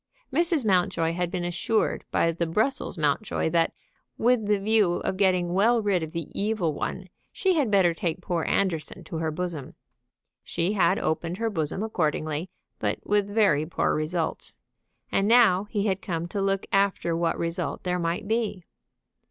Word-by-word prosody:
Mrs. 330 Hz, -3 st, +3 dB
Mountjoy 175 Hz, -4 st, +2 dB
had 175 Hz, 0 st, -1 dB
been 175 Hz, -1 st, -3 dB
assured 180 Hz, +6 st, 0 dB
by 165 Hz, -, +2 dB
the 170 Hz, 0 st, -2 dB
Brussels 215 Hz, +6 st, 0 dB
Mountjoy 155 Hz, +3 st, 0 dB
that, 165 Hz, 0 st, +2 dB, 0.5 s
with 235 Hz, -2 st, +2 dB
the 210 Hz, 0 st, +3 dB
view 205 Hz, -2 st, +3 dB
of 185 Hz, -, -2 dB
getting 185 Hz, -3 st, +2 dB
well 230 Hz, +5 st, +4 dB
rid 200 Hz, -5 st, +1 dB
of 160 Hz, -1 st, -5 dB
the 165 Hz, -2 st, -4 dB
evil 200 Hz, -6 st, 0 dB
one, 185 Hz, +5 st, -4 dB, 0.2 s
she 380 Hz, -1 st, +1 dB
had 290 Hz, -9 st, +1 dB
better 190 Hz, -4 st, +4 dB
take 165 Hz, 0 st, -2 dB
poor 175 Hz, -2 st, -2 dB
Anderson 180 Hz, -1 st, -1 dB
to 160 Hz, -, -6 dB
her 160 Hz, 0 st, -1 dB
bosom. 160 Hz, -3 st, -4 dB, 0.7 s
She 175 Hz, +4 st, -1 dB
had 185 Hz, -1 st, +3 dB
opened 165 Hz, +2 st, -2 dB
her 225 Hz, +1 st, -1 dB
bosom 165 Hz, +2 st, -2 dB
accordingly, 155 Hz, -4 st, -1 dB, 0.3 s
but -, -, -1 dB
with 205 Hz, -1 st, +1 dB
very 195 Hz, -8 st, +2 dB
poor 170 Hz, -, 0 dB
results. 160 Hz, +2 st, -2 dB, 0.5 s
And 195 Hz, -, +2 dB
now 220 Hz, -5 st, +5 dB
he 205 Hz, -1 st, -2 dB
had 195 Hz, -2 st, 0 dB
come 170 Hz, -6 st, -3 dB
to 200 Hz, -, -2 dB
look 195 Hz, 0 st, 0 dB
after 195 Hz, -4 st, +2 dB
what 170 Hz, 0 st, 0 dB
result 170 Hz, +1 st, -3 dB
there 180 Hz, 0 st, -1 dB
might 170 Hz, +3 st, -2 dB
be. 220 Hz, -4 st, -1 dB
180 Hz, 170 wpm, -26 LUFS, 165-205 Hz, 0.7 s, now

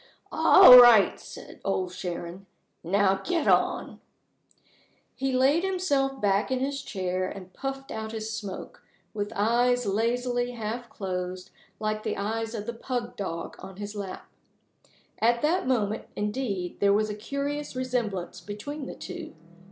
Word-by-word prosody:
"All 250 Hz, 0 st, +9 dB
right," 235 Hz, -5 st, +7 dB
said -, -, -12 dB
Old 185 Hz, -2 st, -1 dB
Sharon. 180 Hz, +1 st, -6 dB, 0.4 s
"Now, 195 Hz, +2 st, +2 dB
get 340 Hz, -4 st, -1 dB
on." -, -, +1 dB, 1.1 s
He 270 Hz, +1 st, -2 dB
laid 270 Hz, +6 st, +3 dB
himself 290 Hz, -8 st, 0 dB
back 200 Hz, +2 st, +1 dB
in 260 Hz, -1 st, 0 dB
his 275 Hz, +1 st, -2 dB
chair, 185 Hz, -5 st, -2 dB
and 185 Hz, -1 st, -10 dB
puffed 270 Hz, 0 st, -5 dB
out 220 Hz, 0 st, -5 dB
his 220 Hz, 0 st, -5 dB
smoke, 200 Hz, -4 st, -7 dB, 0.3 s
with 205 Hz, -1 st, -3 dB
eyes 240 Hz, +4 st, +2 dB
lazily 245 Hz, +4 st, 0 dB
half 235 Hz, +1 st, -5 dB
closed, 185 Hz, -2 st, -5 dB, 0.3 s
like 215 Hz, 0 st, -2 dB
the -, -, -3 dB
eyes 225 Hz, +3 st, -3 dB
of 210 Hz, -1 st, -5 dB
the 235 Hz, -, -4 dB
pug 240 Hz, 0 st, -4 dB
dog 170 Hz, -4 st, -5 dB
on 190 Hz, 0 st, -10 dB
his 205 Hz, +1 st, -6 dB
lap. 200 Hz, -2 st, -6 dB, 0.9 s
At 235 Hz, +1 st, +2 dB
that 335 Hz, +1 st, +1 dB
moment, 220 Hz, -4 st, 0 dB
indeed 205 Hz, -4 st, -3 dB
there 200 Hz, 0 st, +4 dB
was 215 Hz, +1 st, +1 dB
a -, -, -3 dB
curious 280 Hz, +6 st, -4 dB
resemblance 225 Hz, -9 st, -3 dB
between 260 Hz, -, -6 dB
the -, -, -7 dB
two. -, -, -8 dB
220 Hz, 145 wpm, -27 LUFS, 195-255 Hz, 1.1 s, All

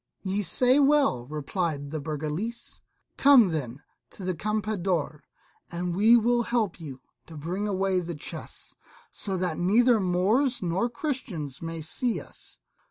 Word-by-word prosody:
"Ye 195 Hz, +1 st, -1 dB
say 250 Hz, +7 st, +3 dB
well," 275 Hz, -, +3 dB
replied 150 Hz, 0 st, -3 dB
the 155 Hz, -, -3 dB
Burgalese: 155 Hz, +10 st, -5 dB, 0.4 s
"come 265 Hz, -8 st, +7 dB
then 140 Hz, -5 st, -4 dB, 0.3 s
to 195 Hz, -, -11 dB
the 185 Hz, -, 0 dB
Campeador, 190 Hz, -6 st, -2 dB, 0.5 s
and 175 Hz, 0 st, -3 dB
we 220 Hz, +5 st, +6 dB
will 240 Hz, +1 st, +2 dB
help 235 Hz, -5 st, -1 dB
you 135 Hz, -5 st, -9 dB, 0.3 s
to 160 Hz, -, -10 dB
bring 180 Hz, +7 st, -3 dB
away 190 Hz, -1 st, +1 dB
the 170 Hz, -1 st, -5 dB
chests, 145 Hz, -, -8 dB, 0.4 s
so 195 Hz, -2 st, -3 dB
that 175 Hz, -3 st, -2 dB
neither 225 Hz, +6 st, +4 dB
Moors 210 Hz, +8 st, +1 dB
nor 180 Hz, +7 st, 0 dB
Christians 220 Hz, -, -4 dB
may 165 Hz, 0 st, -5 dB
see 230 Hz, +9 st, -1 dB
us." -, -, -13 dB
185 Hz, 140 wpm, -27 LUFS, 160-230 Hz, 0.5 s, come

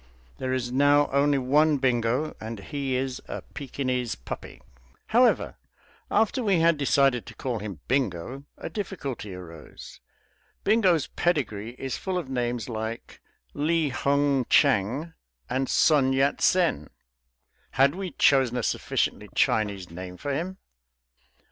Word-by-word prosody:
There 130 Hz, -, -2 dB
is 125 Hz, -2 st, -1 dB
now 145 Hz, +2 st, +4 dB
only 140 Hz, +1 st, +3 dB
one 145 Hz, +4 st, +3 dB
Bingo, 125 Hz, +2 st, 0 dB
and 110 Hz, -1 st, -6 dB
he 135 Hz, +4 st, -3 dB
is 130 Hz, 0 st, -2 dB
a -, -, -6 dB
Pekinese 130 Hz, -3 st, -3 dB
puppy. -, -, -8 dB, 0.5 s
However, 245 Hz, +2 st, +3 dB, 0.5 s
after 225 Hz, +4 st, +2 dB
we 195 Hz, -5 st, +3 dB
had 165 Hz, -2 st, +3 dB
decided 135 Hz, -1 st, +2 dB
to -, -, -10 dB
call 125 Hz, -4 st, -3 dB
him 100 Hz, -7 st, -7 dB
Bingo, 130 Hz, +1 st, -1 dB
a -, -, -6 dB
difficulty 140 Hz, -, -5 dB
arose. 85 Hz, -4 st, -11 dB, 0.6 s
Bingo's 190 Hz, -8 st, +3 dB
pedigree 120 Hz, -, -1 dB
is 135 Hz, -1 st, -4 dB
full 190 Hz, -1 st, -2 dB
of 165 Hz, -7 st, -4 dB
names 120 Hz, -3 st, -2 dB
like 110 Hz, 0 st, -6 dB, 0.3 s
Li 160 Hz, +1 st, +1 dB
Hung 140 Hz, 0 st, +1 dB
Chang 140 Hz, -, +2 dB, 0.3 s
and 130 Hz, +1 st, -1 dB
Sun 140 Hz, -4 st, +4 dB
Yat 135 Hz, +2 st, +1 dB
Sen; 170 Hz, -, +2 dB, 0.8 s
had 135 Hz, +1 st, +4 dB
we 190 Hz, +1 st, -4 dB
chosen 130 Hz, -6 st, +3 dB
a 120 Hz, -, -1 dB
sufficiently -, -, -1 dB
Chinese 100 Hz, -5 st, +1 dB
name 90 Hz, +1 st, -8 dB
for 140 Hz, +7 st, -3 dB
him? 180 Hz, +6 st, -3 dB
135 Hz, 130 wpm, -26 LUFS, 115-150 Hz, 0.8 s, now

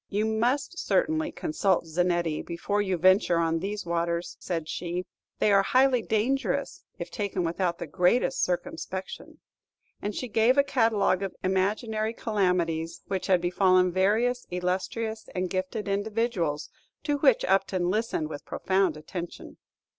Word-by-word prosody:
"You 210 Hz, +2 st, 0 dB
must 245 Hz, +10 st, 0 dB
certainly 315 Hz, -1 st, +1 dB
consult 200 Hz, -, 0 dB
Zanetti 170 Hz, -1 st, 0 dB
before 190 Hz, +4 st, -2 dB
you 190 Hz, -3 st, 0 dB
venture 185 Hz, 0 st, +4 dB
on 165 Hz, 0 st, +1 dB
these 200 Hz, +3 st, -4 dB
waters," 170 Hz, 0 st, -1 dB
said 165 Hz, -3 st, -3 dB
she; 175 Hz, +2 st, -3 dB, 0.3 s
"they 210 Hz, -, +3 dB
are 200 Hz, -1 st, +6 dB
highly 255 Hz, +4 st, +3 dB
dangerous 235 Hz, +6 st, -1 dB
if -, -, -6 dB
taken 200 Hz, -4 st, -2 dB
without 170 Hz, +1 st, -1 dB
the -, -, -5 dB
greatest 190 Hz, -, +2 dB
circumspection;" 485 Hz, -1 st, -4 dB, 0.6 s
and 205 Hz, 0 st, -3 dB
she 250 Hz, -, -3 dB
gave 225 Hz, +4 st, +3 dB
a 280 Hz, -, +6 dB
catalogue 225 Hz, -8 st, +2 dB
of 195 Hz, -2 st, -4 dB
imaginary 215 Hz, +4 st, 0 dB
calamities 175 Hz, -7 st, -1 dB
which 190 Hz, -2 st, -2 dB
had 185 Hz, -3 st, +3 dB
befallen 185 Hz, 0 st, +3 dB
various 220 Hz, +7 st, +1 dB
illustrious 190 Hz, +5 st, -3 dB
and 185 Hz, -1 st, -2 dB
gifted 190 Hz, +3 st, -3 dB
individuals, 200 Hz, -6 st, -1 dB, 0.3 s
to 290 Hz, -1 st, 0 dB
which 270 Hz, -5 st, +4 dB
Upton 190 Hz, -2 st, +1 dB
listened 215 Hz, -7 st, -1 dB
with 145 Hz, -2 st, -7 dB
profound 190 Hz, -4 st, 0 dB
attention. 170 Hz, +3 st, -7 dB
195 Hz, 140 wpm, -27 LUFS, 175-225 Hz, 0.6 s, are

